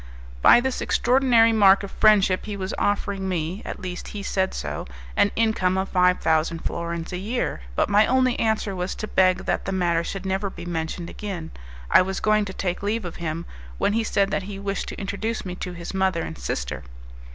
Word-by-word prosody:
By - - +8
this 265 +1 -2
extraordinary 245 -3 +4
mark 200 -2 +6
of 200 - -6
friendship, 200 -3 +4
he 205 -1 -4
was 190 0 -4
offering 200 -1 -1
me 175 +3 -2
at - - -6
least 185 -2 -6
he 200 - -5
said 190 -2 0
so - - -4 0.3
an 205 - +4
income 220 -5 +1
of 190 0 -1
five 180 0 +3
thousand 160 +1 +1
florins 170 +1 -3
a 180 - -3
year; 210 - -2
but - - +2
my 210 +1 +4
only 255 -1 +2
answer 220 -3 0
was 180 +1 -3
to 215 - -5
beg 185 -2 +2
that - - -1
the 195 - -2
matter 175 -3 +1
should 195 +2 -5
never 190 +1 -1
be 175 -2 -9
mentioned 170 0 -3
again. 180 -6 -6 0.4
I - - +8
was 190 +1 -2
going 215 -1 +2
to 190 - -6
take 180 -2 -3
leave 210 +1 -1
of 175 - -6
him, 165 0 -4 0.3
when 205 - +1
he 225 +1 +1
said 200 -2 +1
that - - 0
he 200 - -6
wished 195 0 -3
to - - -6
introduce 215 +3 -3
me 180 - -4
to 180 - -5
his 170 +1 -7
mother 190 -3 +1
and - - -6
sister. 60 +2 -4
190 Hz, 210 wpm, -24 LUFS, 175-210 Hz, 0.4 s, By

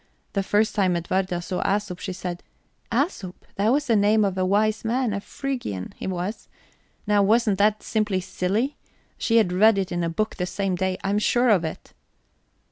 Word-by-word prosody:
The 200 - +1
first 210 +2 +1
time 190 -4 +2
Edwarda 175 +1 -1
saw 180 - -3
Æsop, 200 -2 -1
she 190 - -4
said: 180 -1 -5 0.5
'Æsop 230 - -1 0.2
that 205 +3 +1
was 290 +3 +2
the 235 -4 +2
name 210 +1 +4
of 195 -2 -1
a 185 - 0
wise 210 +3 +1
man 235 0 0
a 200 - -3
Phrygian, 245 - -5
he - - -6
was.' 185 +3 -4 0.6
Now 205 -1 +3
wasn't 210 0 +3
that 210 +1 +2
simply 215 -4 0
silly? 195 +8 -1 0.4
She 230 - +2
had 195 -6 +3
read 215 +3 +5
it 190 -2 -1
in 175 0 -1
a 170 - 0
book 215 +6 -2
the 180 -2 -2
same 190 0 -1
day, 185 +1 -1
I'm 200 +2 +1
sure 245 +3 +2
of 195 -6 +4
it." 160 - -6
200 Hz, 190 wpm, -24 LUFS, 185-220 Hz, 0.6 s, read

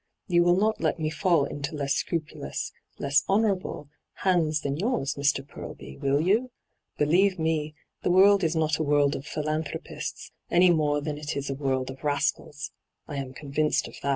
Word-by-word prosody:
You 175 -3 +3
will 175 0 +5
not 215 +3 +1
let - - +1
me 155 -1 -1
fall 165 -2 +2
into 145 +2 -5
less 140 -1 0
scrupulous, 150 - -3 0.3
less 140 +2 +2
honourable, 195 -7 0 0.4
hands 160 -5 +2
than 140 -1 -2
yours, 185 - 0
Mr. 140 -1 0
Purlby, 65 - -9
will 140 +1 +2
you? 210 +10 +2 0.5
Believe 185 +6 +3
me, 155 -2 -1 0.3
the - - 0
world 195 +2 +6
is 165 0 +1
not 155 -1 +1
a - - +1
world 145 -1 +3
of 140 - -7
philanthropists, 155 0 -4 0.2
any 180 +1 +5
more 150 -3 +2
than 150 0 -4
it 150 -1 -4
is 140 0 -3
a - - 0
world 130 -2 -1
of 130 - -13
rascals 145 +1 -1 0.2
— - - -53
I 145 - -5
am 135 -2 -4
convinced 150 +1 0
of - - -12
that.' 140 - -2
150 Hz, 180 wpm, -27 LUFS, 140-175 Hz, 0.5 s, world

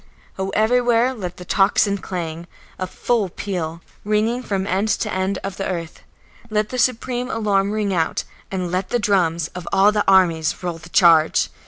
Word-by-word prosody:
Oh, 190 0 -1
everywhere 240 +2 +3
let 180 -7 -6
the 180 - -9
tocsin 200 +1 +2
clang, 170 -2 -5 0.3
a 185 - -2
full 215 +1 -1
peal, 170 -3 -4 0.2
ringing 215 +4 +1
from 195 -5 -2
end 195 +2 0
to 215 0 -1
end 190 +1 -1
of 195 -1 -5
the 195 - -2
earth; 170 -3 -5 0.5
let 215 -1 0
the 255 - -4
supreme 250 0 0
alarm 200 -4 +1
ring 210 -2 -1
out, 165 -3 0 0.3
and 185 -3 -3
let 185 +1 -1
the 245 - +1
drums 170 -7 +1
of 180 -1 -9
all 195 +2 +5
the 210 -1 +1
armies 170 -4 +3
roll 175 -2 -3
the 160 +1 -13
charge! 165 - +4
195 Hz, 175 wpm, -21 LUFS, 175-215 Hz, 0.5 s, all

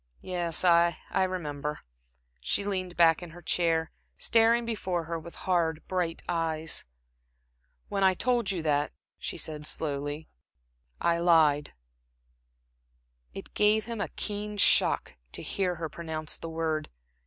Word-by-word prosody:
"Yes, 175 -2 -1
I 170 0 +5
I - - +2
remember." 150 -5 -4 0.6
She 60 - 0
leaned 185 -3 -3
back 165 -1 +5
in 175 - -7
her 175 +2 -12
chair, 165 -1 +1 0.3
staring 230 +1 +4
before 185 -6 -1
her 165 0 -4
with 170 +2 -11
hard, 165 -3 +1
bright 180 -3 -1
eyes. 160 -2 -1 1.0
"When 195 -1 -1
I 190 -1 +5
told 240 0 +1
you 180 -4 -1
that," 145 -1 +1 0.3
she - - -4
said, 150 -1 -5
slowly 145 0 -3 0.7
"I 170 0 +2
I - - -3
lied." 155 -4 +4 1.6
It - - -8
gave 210 +1 +3
him 230 -2 -4
a - - 0
keen 210 0 -3
shock 195 - +3 0.2
to - - -2
hear 185 -3 -1
her 165 -1 -3
pronounce 155 -1 -4
the 165 - -7
word. 160 -1 -2
170 Hz, 140 wpm, -29 LUFS, 160-185 Hz, 1.6 s, I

